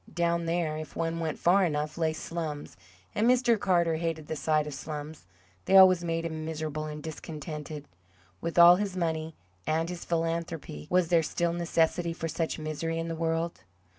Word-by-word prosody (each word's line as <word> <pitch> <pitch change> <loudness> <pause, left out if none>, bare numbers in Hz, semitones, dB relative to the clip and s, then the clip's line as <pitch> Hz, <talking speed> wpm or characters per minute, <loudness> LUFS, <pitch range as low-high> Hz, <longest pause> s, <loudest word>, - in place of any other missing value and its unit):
Down 170 -1 0
there, 165 -2 0
if 155 0 -8
one 165 0 -1
went 160 -2 -2
far 190 +3 +4
enough, 150 -2 -1
lay 160 -1 +1
"slums," 155 -2 -5 0.4
and 220 +3 +2
Mr. 245 -3 +4
Carter 170 -4 +2
hated 165 -2 -3
the 160 - -4
sight 155 0 +1
of 150 - -6
slums; 150 - -7 0.4
they 195 - +6
always 185 -2 +7
made 165 0 -1
him 160 -1 -4
miserable 155 -1 -4
and 150 -1 -7
discontented. 150 -1 -7 0.6
With 170 +1 -4
all 175 +1 +9
his 195 -2 -3
money 160 -2 -2 0.3
and 160 +1 +1
his 180 -1 -6
philanthropy, 165 - -3
was 180 -2 +2
there 170 -2 +5
still 170 +2 -1
necessity 170 0 +1
for 165 0 -4
such 165 0 -2
misery 155 +1 -3
in 165 0 -3
the 165 - -3
world? 165 +1 -2
165 Hz, 175 wpm, -29 LUFS, 155-170 Hz, 0.6 s, all